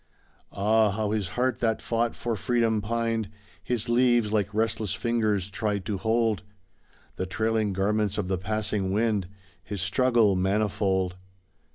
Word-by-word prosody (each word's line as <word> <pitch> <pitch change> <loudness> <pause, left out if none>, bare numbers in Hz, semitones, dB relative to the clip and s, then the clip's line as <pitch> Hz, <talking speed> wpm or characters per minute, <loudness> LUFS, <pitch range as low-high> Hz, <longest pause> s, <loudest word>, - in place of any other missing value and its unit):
Ah! 110 +2 +3
how 105 +1 -1
his 105 -4 -1
heart 125 -1 +1
that 110 -2 +1
fought 115 0 -1
for 120 -2 -2
freedom 115 0 +1
pined; 115 -1 -1 0.3
His 120 -1 -1
leaves, 120 -2 +3
like 105 -2 +1
restless 110 -2 0
fingers, 110 -5 0
tried 100 -2 -2
to 100 -1 -2
hold 110 -2 +1 0.8
The 95 - -2
trailing 110 +1 0
garments 100 +1 0
of - - -1
the 95 -1 -1
passing 105 -1 -1
wind, 105 -3 +1 0.4
His 100 +1 -5
struggle 115 0 +3
manifold. 95 -1 0
110 Hz, 140 wpm, -27 LUFS, 100-115 Hz, 0.8 s, Ah